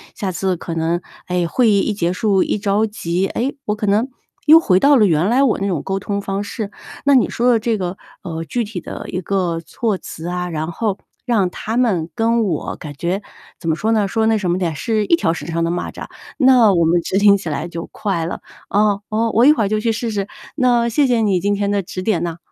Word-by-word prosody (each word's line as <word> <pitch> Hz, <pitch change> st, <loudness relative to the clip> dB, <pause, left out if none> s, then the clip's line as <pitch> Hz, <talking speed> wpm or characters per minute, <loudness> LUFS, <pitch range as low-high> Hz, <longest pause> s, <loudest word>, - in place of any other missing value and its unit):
下 195 Hz, -4 st, -3 dB
次 185 Hz, 0 st, -1 dB
可 165 Hz, -1 st, -6 dB
能， 165 Hz, +2 st, 0 dB, 0.3 s
哎， 180 Hz, -1 st, 0 dB
会 235 Hz, +6 st, +2 dB
议 200 Hz, -1 st, +4 dB
一 210 Hz, -, 0 dB
结 175 Hz, -4 st, 0 dB
束 195 Hz, 0 st, +2 dB
一 -, -, -1 dB
着 205 Hz, +1 st, +1 dB
急， 190 Hz, -3 st, -2 dB
诶， 260 Hz, +8 st, -2 dB
我 210 Hz, -, 0 dB
可 210 Hz, 0 st, -3 dB
能 215 Hz, +6 st, +2 dB, 0.4 s
又 315 Hz, +2 st, +9 dB
回 185 Hz, -, +3 dB
到 285 Hz, 0 st, +6 dB
了 215 Hz, -, +5 dB
原 170 Hz, +1 st, +2 dB
来 250 Hz, +4 st, +3 dB
我 260 Hz, -, +2 dB
那 195 Hz, -, -1 dB
种 175 Hz, -6 st, -1 dB
沟 195 Hz, 0 st, -2 dB
通 200 Hz, +1 st, -3 dB
方 195 Hz, +1 st, -3 dB
式。 205 Hz, 0 st, -5 dB, 0.3 s
那 280 Hz, -1 st, +5 dB
你 255 Hz, -, +4 dB
说 245 Hz, +1 st, +1 dB
的 235 Hz, -, +4 dB
这 225 Hz, 0 st, 0 dB
个， 185 Hz, -1 st, -4 dB, 0.3 s
呃， 165 Hz, -1 st, -4 dB
具 240 Hz, +6 st, -2 dB
体 205 Hz, -5 st, -6 dB
的 -, -, -7 dB
一 185 Hz, -, -3 dB
个 180 Hz, -3 st, -1 dB
措 220 Hz, -5 st, -1 dB
辞 165 Hz, -2 st, -8 dB
啊， 180 Hz, 0 st, -3 dB
然 160 Hz, 0 st, -3 dB
后 200 Hz, +2 st, -2 dB, 0.3 s
让 210 Hz, -7 st, +2 dB
他 220 Hz, +5 st, -4 dB
们 190 Hz, -10 st, +1 dB
跟 230 Hz, +1 st, +2 dB
我 175 Hz, -8 st, -2 dB
感 150 Hz, -, -8 dB
觉 180 Hz, +6 st, -1 dB, 0.4 s
怎 165 Hz, -, -4 dB
么 160 Hz, -, +2 dB
说 220 Hz, +5 st, 0 dB
呢， 210 Hz, -2 st, +2 dB
说 220 Hz, +1 st, +1 dB
那 220 Hz, 0 st, +3 dB
什 185 Hz, -4 st, -1 dB
么 175 Hz, -, +1 dB
点， 170 Hz, -4 st, -1 dB
是 215 Hz, +7 st, 0 dB
一 335 Hz, -, +4 dB
条 165 Hz, -, 0 dB
绳 150 Hz, -2 st, -5 dB
上 165 Hz, 0 st, -1 dB
的 165 Hz, -, 0 dB
蚂 175 Hz, -, -3 dB
蚱， -, -, -8 dB, 0.3 s
那 255 Hz, -7 st, +5 dB
我 170 Hz, -2 st, +3 dB
们 170 Hz, +2 st, +3 dB
执 190 Hz, -, -1 dB
行 200 Hz, 0 st, +6 dB
起 190 Hz, -, -8 dB
来 150 Hz, +2 st, -3 dB
就 170 Hz, -1 st, -6 dB
快 190 Hz, -6 st, -2 dB
了。 170 Hz, -, -5 dB, 0.3 s
啊， 205 Hz, 0 st, +2 dB
呃， 225 Hz, +1 st, 0 dB
我 235 Hz, +3 st, +5 dB
一 300 Hz, -, +8 dB
会 220 Hz, -9 st, 0 dB
就 215 Hz, 0 st, +1 dB
去 225 Hz, +1 st, 0 dB
试 225 Hz, +1 st, -3 dB
试， 200 Hz, -2 st, -2 dB, 0.3 s
那 245 Hz, -4 st, +2 dB
谢 275 Hz, +5 st, +2 dB
谢 240 Hz, -2 st, +2 dB
你 200 Hz, -4 st, +2 dB
今 205 Hz, +3 st, 0 dB
天 200 Hz, 0 st, -1 dB
的 200 Hz, -1 st, +1 dB
指 185 Hz, 0 st, -6 dB
点 185 Hz, -3 st, 0 dB
呢。 170 Hz, -1 st, -3 dB
200 Hz, 265 characters per minute, -19 LUFS, 175-225 Hz, 0.4 s, 又